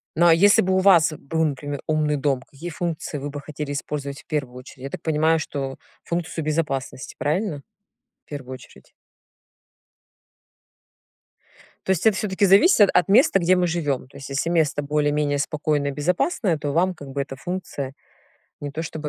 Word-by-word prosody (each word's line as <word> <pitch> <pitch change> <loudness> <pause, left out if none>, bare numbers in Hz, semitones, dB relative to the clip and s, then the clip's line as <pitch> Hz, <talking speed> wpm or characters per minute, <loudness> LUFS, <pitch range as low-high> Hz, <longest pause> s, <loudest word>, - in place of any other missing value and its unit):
Ну, 170 - +4
а 170 - +7
если 200 +5 +5
бы 190 +1 0
у - - +3
вас 170 -5 +5
был, 160 +3 -2
например, 145 -1 -4
умный 155 -1 +1
дом, 135 -2 0
какие 145 +6 -9
функции 165 -2 -4
вы 145 +1 -5
бы 145 0 -6
хотели 150 0 -6
использовать 140 -1 -5
в - - -32
первую 140 -5 -3
очередь? 130 +1 -12
Я - - -4
так - - -7
понимаю, 160 +1 +2
что 135 -3 -4 0.3
функцию 170 -1 -3
безопасности, 150 -4 -3
правильно? 155 0 -1 0.6
В - - -41
первую 130 -3 -7
очередь. 125 - -15 3.0
То 190 - +2
есть 190 +3 0
это 215 -3 +4
всё-таки 200 -1 +1
зависит 200 - +6
от 180 -3 +3
места, 205 -1 +5
где 180 +1 +3
мы 180 -1 +2
живём. 145 -7 -2
То 135 - -15
есть 135 0 -9
если 140 +4 -1
место 160 -4 +1
более-менее 145 0 0
спокойное 145 -1 -1
и - - -8
безопасное, 180 - 0
то 145 -1 -3
вам 180 +4 +2
как 145 -5 -11
бы 140 +1 -2
эта 135 -1 -6
функция 145 -4 -5 0.7
не 145 - -5
то 155 +3 -4
чтобы 155 -2 -5
150 Hz, 175 wpm, -23 LUFS, 140-175 Hz, 3.0 s, а